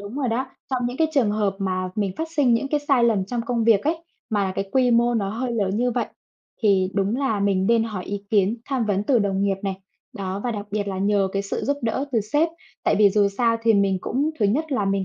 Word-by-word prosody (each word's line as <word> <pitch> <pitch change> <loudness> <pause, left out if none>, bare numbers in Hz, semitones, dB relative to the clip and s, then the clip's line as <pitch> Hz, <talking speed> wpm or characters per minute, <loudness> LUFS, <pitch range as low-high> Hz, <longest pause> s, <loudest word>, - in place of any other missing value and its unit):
đúng 200 +3 -8
rồi 265 -4 -1
đó. 245 +4 -1 0.2
Trong 255 -2 0
những 245 - -4
cái 320 +1 +2
trường 240 -7 +3
hợp 205 -2 0
mà 185 -2 -2
mình 200 -3 -1
phát 320 0 -3
sinh 255 -5 +4
những 275 +4 -1
cái 295 0 0
sai 275 -5 +2
lầm 210 -5 +2
trong 240 +2 -2
công 235 -2 0
việc 220 -3 +4
ấy, 325 +2 -1 0.3
mà 200 -3 0
cái 195 0 -3
quy 255 -2 +3
mô 240 +1 +3
nó 200 -4 0
hơi 240 +3 -3
lớn 200 -4 0
như 245 +2 +1
vậy 240 0 -1 0.6
thì 190 -3 +3
đúng 200 +4 +1
là 245 -7 0
mình 195 -1 +1
nên 230 -1 +3
hỏi 205 -5 -5
ý 200 0 -5
kiến, 205 +1 +2
tham 265 -4 0
vấn 200 0 0
từ 255 -1 +3
đồng 200 -1 0
nghiệp 195 -1 +1
này. 195 -1 -2 0.4
Đó, 195 -3 -4
và 245 - 0
đặc 205 -2 -5
biệt 205 0 -2
là 190 -1 -3
nhờ 200 -1 +2
cái 195 0 -1
sự 200 - -4
giúp 285 +1 0
đỡ 235 +4 -1
từ 230 - +3
sếp. 295 +11 +1 0.4
Tại - - +3
vì 205 -2 +6
dù 205 0 +3
sao 230 +3 +1
thì 225 -1 +4
mình 195 -2 +2
cũng, 285 - -1
thứ 210 - +3
nhất 290 +8 0
là 210 -6 +1
mình 195 -1 0
215 Hz, 265 wpm, -23 LUFS, 200-245 Hz, 0.6 s, vì